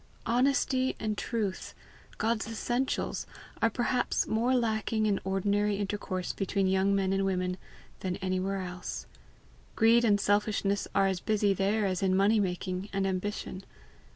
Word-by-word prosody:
Honesty 260 +1 +2
and 215 -1 -1
truth, 210 -4 -3 0.4
God's 225 0 0
essentials, 240 +3 -2 0.3
are 225 - +4
perhaps 245 +2 0
more 240 +4 +1
lacking 220 -2 0
in 205 -2 +2
ordinary 200 +2 +1
intercourse 195 -2 -3
between 195 0 0
young 190 +1 +2
men 195 -1 +1
and 195 0 +1
women 185 -1 0 0.4
than 185 -1 -2
anywhere 190 +1 -1
else. 180 0 -6 0.7
Greed 230 +1 +5
and 205 -3 +4
selfishness 205 0 +1
are 195 -1 +4
as 190 -2 0
busy 210 0 +2
there 200 +3 +1
as 185 -2 -1
in 190 -1 +2
money 210 +3 +4
making 185 0 -2
and 195 0 0
ambition. 190 0 -3
200 Hz, 140 wpm, -30 LUFS, 190-220 Hz, 0.7 s, Greed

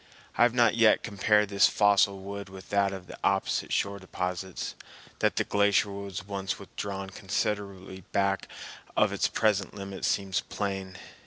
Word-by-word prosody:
I - - 0
have 120 0 +5
not 120 -3 +4
yet 115 -2 +5
compared 105 0 +2
this 100 0 +5
fossil 100 -1 +4
wood 100 +1 -7
with 95 0 -11
that 100 -1 +3
of 95 -2 -7
the - - -11
opposite 95 0 +1
shore 100 0 0
deposits. 90 0 -4 0.5
That - - +2
the - - +2
glacier 100 0 +2
was 100 -1 -6
once 95 -2 -3
withdrawn 95 -1 -6
considerably 95 -1 -3
back 100 -1 +1 0.5
of - - +4
its - - +2
present 105 -3 +1
limit 100 -1 -7
seems 100 -1 +1
plain. 95 -2 -4
100 Hz, 155 wpm, -28 LUFS, 95-100 Hz, 0.5 s, have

